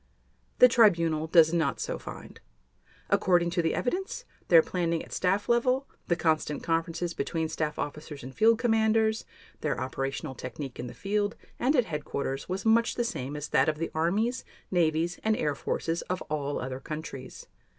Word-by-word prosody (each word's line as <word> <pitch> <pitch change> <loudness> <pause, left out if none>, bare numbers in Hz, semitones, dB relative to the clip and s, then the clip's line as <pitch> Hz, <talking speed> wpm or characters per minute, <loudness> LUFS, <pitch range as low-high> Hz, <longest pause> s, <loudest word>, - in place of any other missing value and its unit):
The 250 - +9
Tribunal 170 -9 +3
does 160 -1 +5
not 160 -5 +1
so - - -3
find. - - -10 0.7
According 175 -2 +3
to 175 0 +1
the 165 -1 0
evidence, 380 - -2 0.2
their 165 -2 +7
planning 170 -2 -1
at - - -11
staff 195 +3 +1
level, 250 +3 +2 0.2
the 170 - +2
constant 155 -3 0
conferences 165 +1 -1
between 160 +2 -2
staff 155 -1 -2
officers 150 -1 -5
and 130 +1 -8
field 225 - +4
commanders, 220 -1 +2 0.3
their - - -1
operational 135 +1 -3
technique 135 +1 -7
in 125 - -4
the - - -9
field 205 +1 -1 0.2
and 270 +5 +2
at 250 -4 +4
headquarters 145 -3 -4
was 190 +3 -3
much 230 +1 +3
the 240 - 0
same 140 - -4
as 150 0 -5
that - - +3
of 155 - -2
the 165 +1 -3
armies, 205 +10 0 0.3
navies, 170 -1 +1
and 220 0 +2
air 150 -1 0
forces 165 +4 -2
of 185 0 -2
all 145 -1 -1
other 130 0 -4
countries. 150 -2 -7
170 Hz, 170 wpm, -28 LUFS, 150-215 Hz, 0.7 s, The